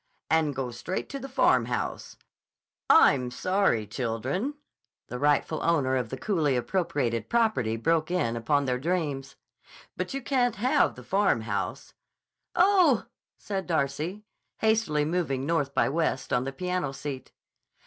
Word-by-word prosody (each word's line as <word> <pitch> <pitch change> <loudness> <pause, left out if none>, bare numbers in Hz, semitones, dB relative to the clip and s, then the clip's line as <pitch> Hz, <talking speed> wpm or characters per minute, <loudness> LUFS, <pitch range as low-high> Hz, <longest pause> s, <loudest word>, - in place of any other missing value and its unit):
"And 155 -3 +2
go 130 -2 -3
straight 120 +10 -4
to 275 - -5
the 270 +1 -7
Farmhouse—" 125 - 0 0.7
"I'm 125 -3 +5
sorry, 185 - +1
children," 130 - -3 0.5
the 125 - -5
rightful 150 +2 +1
owner 140 -6 +2
of 125 -3 -1
the 130 - -5
coolly 150 -6 +1
appropriated 125 -6 -1
property 220 - +1
broke 160 +6 +1
in 145 -11 0
upon 140 +5 +1
their 125 -1 -1
dreams; 145 -4 -2 0.6
"but - - -4
you 275 - -4
can't 245 -4 +1
have 245 +5 +2
the 125 - -11
Farmhouse." 115 - -1 0.6
"Oh!" 355 - +4 0.3
said 195 -2 -4
Darcy, 160 +5 -1 0.3
hastily 220 -10 +1
moving 150 -5 -1
north 145 -3 0
by - - +3
west 160 -3 -1
on 125 +1 +1
the 135 - -3
piano 180 -2 -2
seat. 135 -1 -6
150 Hz, 135 wpm, -27 LUFS, 130-190 Hz, 0.7 s, I'm